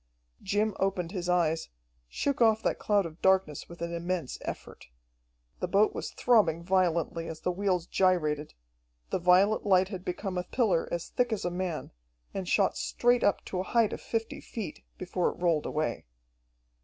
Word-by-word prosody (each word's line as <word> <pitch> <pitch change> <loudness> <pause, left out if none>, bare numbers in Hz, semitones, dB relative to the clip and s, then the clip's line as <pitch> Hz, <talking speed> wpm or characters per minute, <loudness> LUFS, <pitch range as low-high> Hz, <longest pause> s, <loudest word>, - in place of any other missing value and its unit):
Jim 205 +1 0
opened 190 -3 0
his 180 -3 -3
eyes, 165 -2 +1 0.4
shook 280 - -2
off 220 -1 +4
that - - 0
cloud 205 -3 +2
of 165 0 -9
darkness 190 -6 +2
with 170 0 -8
an 170 0 -3
immense 170 -4 -3
effort. - - -7 0.7
The - - -1
boat 200 +4 +3
was - - -4
throbbing 190 -9 +3
violently 170 -3 +1
as 160 -1 -7
the 180 - 0
wheels 185 -2 0
gyrated, 155 -6 +1 0.6
the - - 0
violet 185 +4 +4
light 190 -2 +4
had 185 -3 -6
become 185 0 -3
a - - -2
pillar 190 -4 +1
as 170 -1 -3
thick 245 -1 0
as 215 -4 -2
a 175 - 0
man, 180 -3 -3 0.4
and 190 -2 -4
shot 195 -2 +3
straight 245 0 +2
up 200 - +2
to 185 - -3
a - - 0
height 225 -3 +4
of - - -6
fifty 225 -1 -3
feet, 220 -4 -7
before 180 -1 -1
it - - -9
rolled 170 -4 +1
away. 155 - -2
185 Hz, 175 wpm, -29 LUFS, 170-200 Hz, 0.7 s, off